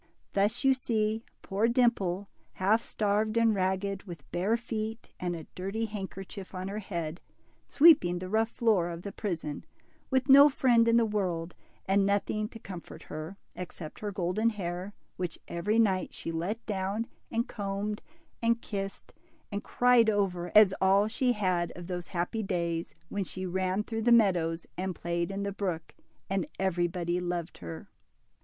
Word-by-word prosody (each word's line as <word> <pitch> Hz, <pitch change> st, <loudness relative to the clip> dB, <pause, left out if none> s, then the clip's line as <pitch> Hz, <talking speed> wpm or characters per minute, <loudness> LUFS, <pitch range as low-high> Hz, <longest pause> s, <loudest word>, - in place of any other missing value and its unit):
Thus 205 Hz, +6 st, +1 dB
you 270 Hz, 0 st, +6 dB
see 220 Hz, -3 st, 0 dB, 0.2 s
poor 205 Hz, +3 st, +1 dB
Dimple, 205 Hz, -6 st, +2 dB, 0.3 s
half 210 Hz, +5 st, +3 dB
starved 215 Hz, 0 st, 0 dB
and 230 Hz, -1 st, +4 dB
ragged, 190 Hz, 0 st, 0 dB
with 170 Hz, -7 st, -9 dB
hare 200 Hz, +6 st, +2 dB
feet, 225 Hz, -1 st, -5 dB
and 175 Hz, -1 st, -2 dB
a 160 Hz, -2 st, -7 dB
dirty 195 Hz, +5 st, -2 dB
handkerchief 195 Hz, -2 st, -7 dB
on 185 Hz, +1 st, -4 dB
her 205 Hz, +2 st, -3 dB
head, 170 Hz, -4 st, -4 dB, 0.5 s
sweeping 280 Hz, -, +6 dB
the 185 Hz, +1 st, -5 dB
rough 220 Hz, +3 st, +2 dB
floor 215 Hz, -8 st, +2 dB
of 170 Hz, 0 st, -6 dB
the 200 Hz, -, -5 dB
prison, 170 Hz, -8 st, -4 dB, 0.5 s
with 260 Hz, 0 st, +2 dB
no 280 Hz, +2 st, +9 dB
friend 240 Hz, -4 st, +4 dB
in 230 Hz, 0 st, +5 dB
the 235 Hz, -, +4 dB
world, 180 Hz, -5 st, -1 dB, 0.3 s
and 195 Hz, +1 st, +3 dB
nothing 205 Hz, +2 st, 0 dB
to 225 Hz, -, -10 dB
comfort 185 Hz, -5 st, -9 dB
her, 155 Hz, +5 st, -7 dB, 0.2 s
except 170 Hz, -3 st, -7 dB
her 210 Hz, -1 st, -3 dB
golden 195 Hz, +4 st, +1 dB
hair, 185 Hz, -1 st, -4 dB, 0.2 s
which 175 Hz, -2 st, -3 dB
every 205 Hz, +6 st, 0 dB
night 195 Hz, -5 st, +2 dB
she -, -, -4 dB
let 180 Hz, +8 st, -3 dB
down, 200 Hz, +2 st, -1 dB, 0.2 s
and 235 Hz, +2 st, 0 dB
combed, 205 Hz, 0 st, -3 dB, 0.4 s
and 230 Hz, 0 st, +3 dB
kissed, 195 Hz, -3 st, -5 dB, 0.4 s
and 205 Hz, 0 st, -3 dB
cried 245 Hz, -2 st, +4 dB
over, 185 Hz, -4 st, 0 dB
as 210 Hz, -3 st, +8 dB
all 195 Hz, +2 st, +5 dB
she 250 Hz, +3 st, +1 dB
had 185 Hz, -5 st, 0 dB
of 175 Hz, -, -8 dB
those 175 Hz, -1 st, -4 dB
happy 180 Hz, +5 st, -2 dB
days 170 Hz, -4 st, -2 dB
when 205 Hz, -, -1 dB
she 185 Hz, 0 st, -6 dB
ran 185 Hz, +2 st, 0 dB
through 225 Hz, 0 st, -3 dB
the 240 Hz, +2 st, +3 dB
meadows 175 Hz, -7 st, +4 dB
and 185 Hz, -1 st, -2 dB
played 170 Hz, +1 st, -2 dB
in 195 Hz, 0 st, -3 dB
the 200 Hz, -, -1 dB
brook, 180 Hz, -5 st, -3 dB, 0.3 s
and 190 Hz, -4 st, -1 dB
everybody 175 Hz, -1 st, 0 dB
loved 175 Hz, -1 st, -3 dB
her. 85 Hz, -2 st, -7 dB
195 Hz, 160 wpm, -30 LUFS, 175-220 Hz, 0.5 s, no